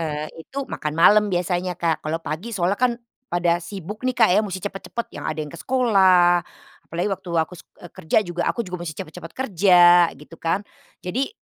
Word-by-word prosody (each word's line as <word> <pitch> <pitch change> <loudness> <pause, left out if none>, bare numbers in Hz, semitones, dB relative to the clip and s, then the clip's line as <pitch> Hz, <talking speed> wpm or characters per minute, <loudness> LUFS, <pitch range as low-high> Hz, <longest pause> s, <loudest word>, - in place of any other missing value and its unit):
eee, 155 -1 -3 0.2
itu 275 +9 -5
makan 150 -10 -4
malam 210 +5 +6
biasanya, 180 -1 -1
Kak, 165 -2 0
kalau 155 +1 -1
pagi 165 +10 -5
soalnya 185 +3 0
kan 250 -1 +3 0.4
pada 175 0 +1
sibuk 195 +3 -8
nih, 255 - 0
Kak, 225 - +5
ya, 205 - +5
mesti 190 -3 -4
cepet-cepet, 205 +4 -5
yang - - -8
ada 155 - -3
yang 150 -1 -5
ke 170 - -10
sekolah, 190 -9 +4 0.5
apalagi 175 +4 -2
waktu 190 -1 -6
aku 160 +1 0
sek - - -16 0.2
eee, 175 - -11
kerja 160 - +1
juga 175 0 -3
aku 235 - -1
juga 180 -2 -6
mesti 155 -3 -6
cepet-cepet 165 +1 -8
kerja, 175 -7 +5
gitu 150 +4 -14
kan. 170 +5 -1 0.4
Jadi 245 +10 -1
175 Hz, 195 wpm, -22 LUFS, 165-205 Hz, 0.5 s, malam